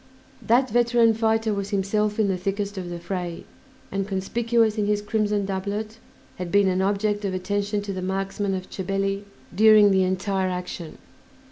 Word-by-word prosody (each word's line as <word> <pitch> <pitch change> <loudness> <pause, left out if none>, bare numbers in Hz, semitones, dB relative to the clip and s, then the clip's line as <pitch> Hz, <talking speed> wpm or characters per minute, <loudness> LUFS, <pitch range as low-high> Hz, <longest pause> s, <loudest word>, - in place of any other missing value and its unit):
That 245 +4 +3
veteran 235 -1 +4
fighter 220 0 +1
was 200 0 -3
himself 210 +1 0
in 215 - +3
the 190 - +1
thickest 200 +2 -3
of 185 -2 -5
the 175 - -5
fray, 175 -1 -5 0.5
and, 195 0 -2
conspicuous 220 +3 +1
in 205 - +1
his 210 0 +2
crimson 210 -1 0
doublet, 205 +3 -4 0.4
had 180 -1 -5
been 200 -1 +4
an 185 0 +1
object 205 +1 0
of 190 -2 -1
attention 205 +2 -1
to 200 -1 -4
the 185 - -4
marksmen 195 +1 -2
of 185 0 -5
Chabelli 195 +1 -2 0.3
during 215 0 +7
the 190 -1 +3
entire 190 +1 0
action. 180 -2 -6
200 Hz, 165 wpm, -24 LUFS, 190-215 Hz, 0.5 s, during